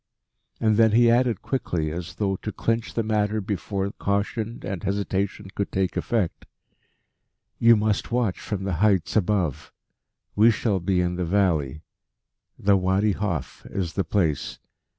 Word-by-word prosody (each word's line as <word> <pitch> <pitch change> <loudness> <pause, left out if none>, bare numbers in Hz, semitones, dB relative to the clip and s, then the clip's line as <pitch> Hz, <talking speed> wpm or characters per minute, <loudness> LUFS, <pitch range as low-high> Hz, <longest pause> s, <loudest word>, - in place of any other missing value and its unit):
And 110 -2 +2
then 110 -2 +5
he 120 +1 +6
added 120 -1 +2
quickly, 85 - -2
as 85 +1 -6
though 100 -1 0
to 105 - -5
clinch 115 +1 -2
the 115 - +1
matter 105 0 0
before 100 0 -3
caution 105 +4 -2
and 95 -4 -4
hesitation 100 0 -2
could 100 - -3
take 95 -2 -1
effect: 110 -8 -1 1.1
"You 115 0 +7
must 105 0 0
watch 120 -6 0
from 100 -2 -4
the 95 -4 -2
heights 100 -5 +2
above. 85 -9 0 0.6
We 110 +3 +6
shall 105 -3 +1
be 90 +1 +1
in 90 0 -1
the 90 - -1
valley 80 -6 +1 0.7
the 100 0 +3
Wadi 95 +3 +2
Hof 95 -7 -3
is 90 -4 -3
the 95 - 0
place. 80 -4 -1
100 Hz, 150 wpm, -24 LUFS, 90-110 Hz, 1.1 s, You